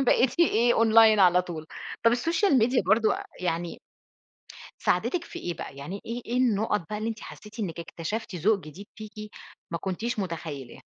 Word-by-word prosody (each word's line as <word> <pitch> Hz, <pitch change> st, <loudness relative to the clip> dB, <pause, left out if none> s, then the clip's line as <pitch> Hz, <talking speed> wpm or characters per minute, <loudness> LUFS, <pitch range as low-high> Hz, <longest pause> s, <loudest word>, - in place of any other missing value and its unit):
بقيتِ 255 Hz, +6 st, +3 dB
إيه، 240 Hz, -7 st, +4 dB
أونلاين 225 Hz, -2 st, +6 dB
على 180 Hz, -1 st, +6 dB
طول. 160 Hz, -3 st, -7 dB, 0.4 s
طب 230 Hz, -, +6 dB
السوشيال 325 Hz, -, +2 dB
ميديا 245 Hz, 0 st, +3 dB
برضه 215 Hz, +3 st, +4 dB
أ -, -, -6 dB, 0.2 s
يعني 170 Hz, -1 st, -2 dB, 1.0 s
ساعدِتِك 345 Hz, -2 st, 0 dB
في -, -, -8 dB
إيه 175 Hz, -1 st, -4 dB
بقى؟ 135 Hz, -, -8 dB
يعني 175 Hz, +9 st, -6 dB
إيه 235 Hz, +2 st, -4 dB
إيه 240 Hz, -, -2 dB
النُّقط 220 Hz, -4 st, +2 dB
بقى، 210 Hz, -, -2 dB
اللي 220 Hz, -, -2 dB
أنتِ 225 Hz, 0 st, -5 dB
حسّيتِ 210 Hz, +2 st, -11 dB
إنِّك 170 Hz, -4 st, -3 dB
اكتشفتِ 195 Hz, +6 st, -5 dB
ذوق 200 Hz, +5 st, +2 dB
جديد 175 Hz, +6 st, -11 dB
فيكِ، 215 Hz, -1 st, -9 dB, 0.6 s
ما 170 Hz, -, -2 dB
كنتيش 215 Hz, +5 st, -3 dB
متخيِّلاه؟ 160 Hz, -8 st, -5 dB
210 Hz, 170 wpm, -27 LUFS, 175-230 Hz, 1.0 s, أونلاين